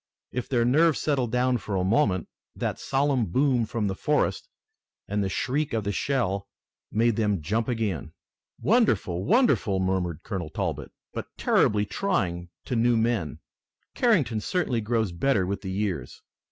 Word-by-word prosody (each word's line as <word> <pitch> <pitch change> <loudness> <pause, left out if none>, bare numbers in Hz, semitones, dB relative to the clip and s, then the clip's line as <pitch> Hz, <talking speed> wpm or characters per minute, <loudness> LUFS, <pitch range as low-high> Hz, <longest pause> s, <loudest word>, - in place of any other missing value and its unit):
If 125 -1 -4
their 120 -4 +2
nerves 155 +5 +4
settled 130 -6 0
down 125 0 +2
for 105 - -4
a 90 - +1
moment, 95 - +2 0.3
that - - -3
solemn 135 -4 +1
boom 125 +3 +2
from 115 -1 -2
the 95 - 0
forest - - 0 0.6
and 105 0 0
the 95 - -1
shriek 135 +9 -1
of 110 -2 0
the 100 - -1
shell 100 -6 -1 0.4
made 115 0 +2
them 105 -7 0
jump 110 +7 0
again. 110 - -2 0.5
"Wonderful! 105 - +2
Wonderful!" 215 - +3
murmured 95 -4 -1
Colonel 95 -7 -4
Talbot, - - -3 0.2
"but - - -5
terribly 105 0 +3
trying 90 - -1 0.2
to 125 - -2
new 120 0 +3
men! 110 - -1 0.5
Carrington 165 - +2
certainly 140 - 0
grows 110 -2 0
better 100 +2 +1
with 100 +2 -3
the 95 - -5
years." 95 - -3
110 Hz, 155 wpm, -26 LUFS, 95-130 Hz, 0.6 s, nerves